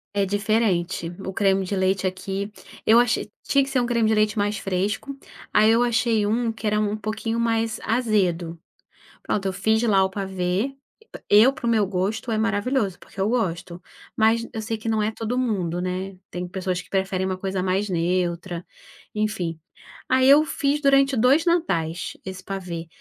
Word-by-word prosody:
É 200 -1 +1
diferente, 200 -5 0
o 190 - -4
creme 195 0 +2
de 200 - -2
leite 190 0 +1
aqui. 195 +2 -3 0.3
Eu 225 +2 +6
achei 235 -3 +1
tinha 275 -1 +3
que 270 - -5
ser 265 - +1
um - - 0
creme 235 -2 +2
de 220 - +3
leite 215 0 +2
mais 205 0 0
fresco, 200 +8 -2 0.3
aí 215 +1 +5
eu 230 +1 +4
achei 235 -2 +2
um 230 +2 0
que 220 0 -5
era 210 0 +2
um 210 0 0
pouquinho 220 +2 -3
mais 225 -1 0
azedo. 185 -8 0 0.6
Pronto, 200 -2 -2
eu 190 - -1
fiz 220 +4 +1
lá 200 -4 +4
o 190 - 0
pavê. 190 +5 -2 0.5
E 205 - +7
eu, 265 +3 +4
pro 275 -5 -5
meu 220 -3 +3
gosto, 200 +5 -2
é 220 - +1
maravilhoso, 215 -2 0
porque - - -14
eu 200 - +1
gosto, 180 -6 -2 0.4
mas 225 +1 +3
eu 220 - -3
sei 225 +1 -3
que 220 +1 -4
não 220 -1 +1
é 215 - 0
todo 225 +2 -3
mundo, 190 -9 -1
né. 185 +1 -4
Tem 180 0 -4
pessoas 185 0 -3
que - - -20
preferem 190 -1 -1
uma 185 -1 -2
coisa 190 0 -2
mais 190 +2 0
neutra, 175 0 -1 0.5
enfim. 210 -7 -2 0.5
Aí 260 0 +4
eu 290 +2 +8
fiz 290 0 0
durante 275 -1 +4
dois 265 +8 +4
Natais 175 - 0
esse 185 -1 -7
pavê. 180 -4 -5
205 Hz, 185 wpm, -23 LUFS, 185-230 Hz, 0.6 s, eu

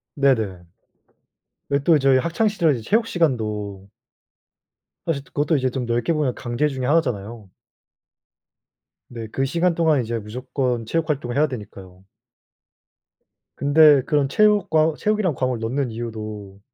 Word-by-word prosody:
네네. 110 -10 +1 1.1
왜 140 - +2
또 165 -1 +5
저희 135 -1 +4
학창 170 +10 0
시절에 165 - +1
체육 225 - +1
시간도 105 - -2 1.2
사실 145 -5 -2
그것도 145 +2 0
이제 130 -1 0
좀 125 0 -4
넓게 120 +8 0
보면 150 -5 0
강제 120 +4 -1
중에 130 -3 -4
하나잖아요. 115 - -1 1.6
네, 115 -2 -7
그 135 +5 -2
시간 170 +4 +1
동안 160 -5 +2
이제 115 0 -3
무조건 125 +2 -3
체육 160 +6 -2
활동을 125 -5 -2
해야 150 +2 +3
되니까요. 95 -7 -10 1.5
근데 145 0 +5
그런 145 -2 +1
체육과 175 -5 +3
체육이란 210 -7 0
과목을 125 -3 -1
넣는 125 +3 -2
이유도 110 -4 -7
130 Hz, 280 characters per minute, -22 LUFS, 115-155 Hz, 1.6 s, 또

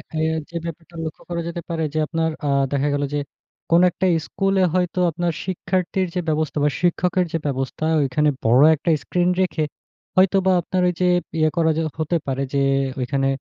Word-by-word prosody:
এ্যাঁ 160 0 0
যে, 170 - -14
ব্যাপারটা 170 +1 -8
লক্ষ্য 155 - -7
করা 170 -1 -2
যেতে 170 0 -4
পারে 165 -1 -1
যে, - - -2
আপনার 165 -1 0 0.2
আ - - +1 0.2
দেখা 140 +1 +1
গেল 145 0 0
যে, 145 - +1 0.5
কোন 170 +1 +6
একটা 185 - -2 0.2
স্কুলে 195 -1 +1
হয়তো 180 0 0
আপনার 170 +1 -1
শিক্ষার্থীর 185 0 -1
যে, - - +1
ব্যবস্থা 155 -1 -1
বা, 150 - +4
শিক্ষকের 180 +1 +1
যে, 165 - 0
ব্যবস্থা 135 +2 -2 0.2
ঐখানে 150 +3 +2 0.2
বড় 120 +4 +5
একটা 155 +3 -3
স্ক্রিন 180 0 +1
রেখে, 170 -4 0 0.5
হয়তোবা 190 0 +4
আপনার 185 +2 -1
ওইযে 180 +1 -1 0.3
ইয়ে 155 0 +4
করা 160 -1 +3
যে - - +1 0.2
হতে 165 +2 +1
পারে 135 +1 -1
যে, 140 - +2 0.4
ঐখানে 135 +2 0
165 Hz, 180 wpm, -22 LUFS, 150-180 Hz, 0.5 s, কোন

